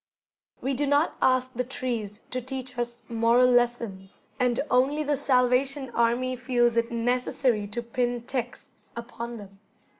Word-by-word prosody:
We 270 - -1
do 285 +2 -1
not 285 +3 +2
ask 255 0 +2
the 250 0 -1
trees 230 -5 -4
to 255 - -2
teach 260 0 -6
us 240 0 -4
moral 230 +2 +4
lessons, 235 -6 0 0.2
and 250 -1 +2
only 275 +5 +3
the 295 0 +1
Salvation 265 0 +2
Army 240 +2 +1
feels 240 -1 +1
it 230 0 +1
necessary 240 -2 0
to 235 +4 -4
pin 240 0 -1
texts 245 -1 -6
upon 235 0 -6
them. 195 -2 -12
245 Hz, 145 wpm, -26 LUFS, 235-255 Hz, 0.2 s, moral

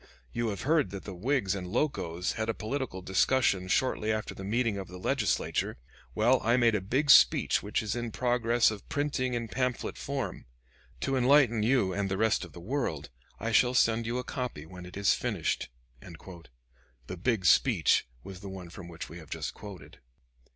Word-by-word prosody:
You 120 0 -1
have 100 -3 -3
heard 150 - +2
that 100 +1 -7
the 100 - -7
Whigs 110 +1 0
and 95 -2 -5
Locos 90 - -1
had 110 0 -3
a 115 - 0
political 115 -5 -4
discussion 95 -1 +2
shortly 110 +1 +1
after 110 -1 -3
the 95 - -9
meeting 110 0 0
of 95 - -6
the 90 - -10
Legislature. 110 +1 -1 0.4
Well, 120 +4 +3
I 115 +2 +3
made 120 -2 +4
a 105 - 0
big 135 +9 +2
speech - - +6
which 105 +2 -2
is 110 +1 -2
in 120 -1 -3
progress 120 -1 +2
of 105 -2 -9
printing 140 -3 -1
in 115 -1 -3
pamphlet 125 +2 -2
form. 135 - -4 0.5
To 135 - 0
enlighten 125 -3 +4
you 110 -5 +2
and 100 0 -1
the 95 - -1
rest 110 0 +2
of - - -9
the - - -10
world, 90 - -3 0.3
I 115 +2 -2
shall 125 +2 +4
send 115 -1 +3
you 120 +2 -1
a 125 - -2
copy 125 - -5
when 90 +1 -10
it 90 - -10
is 100 0 +3
finished." - - -2 0.3
The 65 -5 -13
"big 105 0 0
speech" - - +4 0.2
was 95 -2 -9
the 100 0 -8
one 90 -3 -8
from 90 -1 -10
which 85 -1 -8
we 85 +3 -10
have 80 -3 -13
just - - -4
quoted. 100 -3 -11
110 Hz, 190 wpm, -29 LUFS, 90-125 Hz, 0.5 s, speech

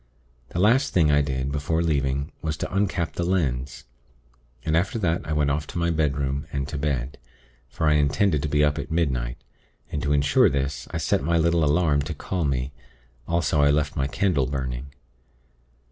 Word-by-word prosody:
The - - -7
last 120 +9 +3
thing 80 -5 +4
I 75 0 +4
did, 65 -1 -2
before 75 +3 0
leaving, 70 -3 0
was 80 -1 -2
to - - -3
uncap 95 -4 0
the 85 - -2
lens; 70 -8 -1 0.8
and 80 - +1
after 95 +7 +1
that 85 -5 0
I - - -4
went 75 -1 +2
off 75 0 -2
to - - -7
my 85 0 +1
bedroom, 70 -3 -1
and 70 -1 -2
to 75 - -4
bed; 70 -3 -2 0.5
for 65 +6 -3
I 75 - +5
intended 75 +3 +2
to 75 - -2
be 75 0 +3
up 75 0 +2
at 70 - -5
midnight; 65 -8 -1 0.5
and 75 - -2
to 75 - -1
ensure 75 0 +4
this, 70 +1 -2
I - - -3
set - - +1
my 85 +3 +2
little 85 0 +2
alarm 75 -1 +3
to 70 - -5
call 90 -4 -2
me; 65 -1 -1 0.6
also 85 -3 +1
I 70 - +5
left 75 +1 +1
my 70 -1 0
candle 75 -4 +1
burning. 65 -1 -4
75 Hz, 190 wpm, -24 LUFS, 70-85 Hz, 0.8 s, I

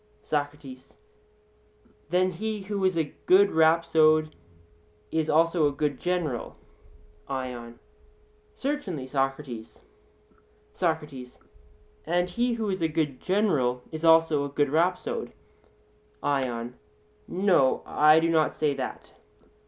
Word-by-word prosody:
SOCRATES: 145 -3 -5 1.1
Then 185 +1 +2
he 215 +3 -4
who 200 0 -3
is 185 -2 +2
a 155 -3 -1
good 200 +2 +6
rhapsode 160 -1 +3 0.8
is 160 -1 -1
also 165 0 +3
a - - 0
good 145 -1 -2
general? 175 -9 -2 0.7
ION: 125 -3 -5 0.8
Certainly, 270 - -3
Socrates. 135 -3 -3 0.9
SOCRATES: 150 -7 -3 0.7
And 175 +2 0
he 240 +5 0
who 220 -3 -2
is 185 -2 -3
a 165 - +2
good 150 -4 -2
general 150 - +1
is 160 0 -6
also 160 -3 +5
a 140 - -4
good 145 0 0
rhapsode? 175 +4 -1 0.9
ION: 125 -3 -2 0.5
No; 180 -8 +2
I 155 +1 +5
do 165 +1 +1
not 155 -2 +2
say 150 -2 +1
that. - - -6
155 Hz, 110 wpm, -26 LUFS, 140-180 Hz, 1.1 s, good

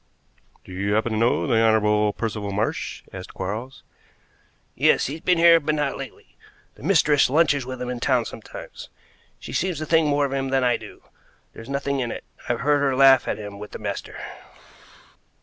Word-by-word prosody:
"Do - - -14
you 100 +3 -1
happen 110 +2 0
to 110 - -1
know 115 +2 +2
the 115 -5 +2
Honorable 105 -1 +3
Percival 105 -3 -4
Marsh?" 105 +3 -3
asked 90 -1 -9
Quarles. 110 +8 -5 0.9
"Yes. - - +3
He's 155 +4 -5
been 180 -1 +2
here, 165 0 +7
but 155 0 -1
not 145 -2 -1
lately. - - -10 0.4
The - - -18
mistress 150 -5 +3
lunches 145 -3 +2
with 130 -1 -6
him 125 0 -4
in 125 - -5
town 125 -2 +1
sometimes. 110 - -10 0.5
She - - -9
seems 180 -2 -1
to 155 - -4
think 160 0 +3
more 145 0 +2
of 135 - -4
him 135 0 -1
than 135 -1 +1
I 125 -1 +3
do. - - -11 0.5
There's 115 - -11
nothing 140 0 -1
in 120 -2 -2
it. - - -6 0.3
I've 120 - 0
heard 145 +1 +3
her 140 -2 +1
laugh 135 -1 +6
at - - -1
him 105 -1 -8
with 105 0 -9
the - - -5
master." - - -5
130 Hz, 190 wpm, -23 LUFS, 110-145 Hz, 0.9 s, here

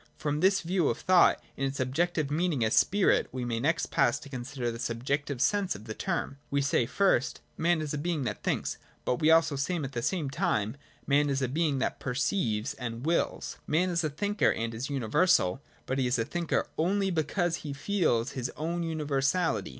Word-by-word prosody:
From 150 -1 -1
this 195 +4 +3
view 175 -2 +1
of 115 - -1
thought, 185 -2 +4 0.2
in 135 - -1
its 135 +1 -5
objective 150 +3 0
meaning 155 -6 +1
as 110 - +5
voOf, 200 0 +2
we 125 -1 -4
may 115 -1 -1
next 160 +7 0
pass - - +3
to 145 - -11
consider 125 -1 -4
the 115 - -7
subjective.sense 140 - 0
of 100 - -10
the 110 - -5
term. 170 - -3
We 140 - +1
say 130 -4 +2
first, 190 -8 +1
Man 170 0 +1
is 150 -1 -3
a 150 - -2
being 165 -2 -1
that 120 - -3
thinks; - - -1 0.3
but 125 - 0
we 155 - +4
also 160 -2 +5
say 140 +7 -1
at 140 -6 -3
the' 120 -3 -3
same 150 0 -1
time, 110 -3 0 0.3
Man 145 +1 +3
is 135 -1 0
a - - +1
being 150 +1 0
that 130 - -1
perceives 125 - -1
and 120 -2 -6
wills. 170 +1 -1
Man 180 +4 +2
is 170 -1 0
a 155 - +1
thinker, 205 +8 +1
and 115 0 -3
is 120 +5 -4
universal: 140 - +2 0.2
but 130 +1 -1
he 130 - +2
is 125 - +1
a 115 - 0
thinker 170 +5 -1
only 195 +4 +1
because 170 +1 0
he 150 - -6
feels 140 - 0
his 125 -2 -3
own 170 +3 -2
universality. 155 +1 0
145 Hz, 200 wpm, -29 LUFS, 125-170 Hz, 0.3 s, as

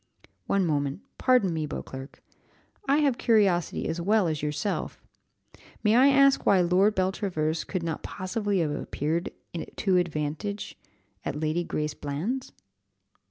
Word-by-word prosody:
"One 195 -2 +2
moment 145 +1 -1 0.2
pardon 250 -9 +3
me, 155 -2 -2
Beauclerc; 135 -1 -8 0.6
I 280 - +4
have 265 -4 +1
curiosity 200 -7 +2
as 170 +1 -2
well 205 +1 +3
as 155 -2 -2
yourself. 150 +7 -2 0.8
May 215 0 +4
I 260 +3 +7
ask 275 0 +5
why 195 - +5
Lord 185 +4 +3
Beltravers 185 -4 -1
could 185 -3 -3
not 165 -2 -3
possibly 200 0 -2
have 155 -2 0
appeared 155 +3 -2 0.5
to 190 -3 +2
advantage 170 +4 -2 0.5
at 145 - -3
Lady 155 +3 0
Grace 150 -2 -2
Bland's?" 170 - -3
180 Hz, 130 wpm, -27 LUFS, 155-210 Hz, 0.8 s, I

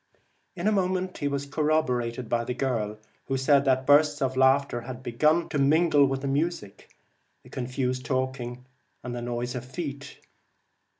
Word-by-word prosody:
In - - -5
a - - +4
moment 185 -2 -1
he 145 - -1
was 140 0 -2
corroborated 130 -6 0
by 120 +1 0
the 125 +1 -4
girl, 115 -5 -2 0.3
who 135 - 0
said 140 +1 +3
that 130 -1 +2
bursts 145 +1 +4
of 130 -2 -1
laughter 130 -1 +3
had 125 +1 -8
begun 155 +8 +2
to 145 - -1
mingle 145 0 +4
with 135 0 -2
the 140 - -3
music, 145 - -3 0.5
the - - -16
confused 130 0 -2
talking, 130 -2 -3 0.4
and 125 - -5
the 120 - -4
noise 120 0 -3
of 125 - -5
feet. 140 +1 -7
135 Hz, 165 wpm, -26 LUFS, 125-145 Hz, 0.5 s, a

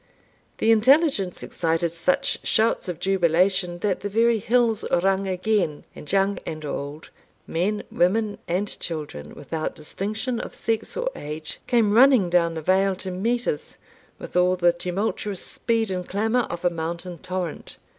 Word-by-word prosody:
The 225 - +3
intelligence 235 - +3
excited 165 0 -1
such 170 +2 0
shouts 220 -3 +1
of 170 -2 -4
jubilation, 180 0 +2
that 200 -3 0
the 205 +2 -4
very 230 +2 +3
hills 230 0 +2
rung 195 +2 +2
again, 185 -4 0
and 150 - -8
young 195 +1 +2
and 155 -1 -6
old, 145 +1 -6 0.3
men, 200 +6 -1
women, 205 +4 +1
and 185 +4 0
children, 145 - -5
without 155 +2 -4
distinction 215 - -3
of - - -7
sex 225 -1 -2
or - - -1
age, 150 +1 -6
came 225 -4 +3
running 240 -6 +6
down 170 -2 +3
the 160 - -5
vale 190 +2 +3
to 185 0 -6
meet 235 +7 -1
us, 150 - -3 0.4
with - - -10
all 180 +1 +4
the 175 -1 +3
tumultuous 190 +2 -3
speed 225 -3 -1
and 180 -1 -4
clamour 225 +5 +1
of 170 +1 -5
a 175 - +4
mountain 170 +1 -5
torrent. 185 -3 -5
185 Hz, 155 wpm, -24 LUFS, 170-220 Hz, 0.4 s, running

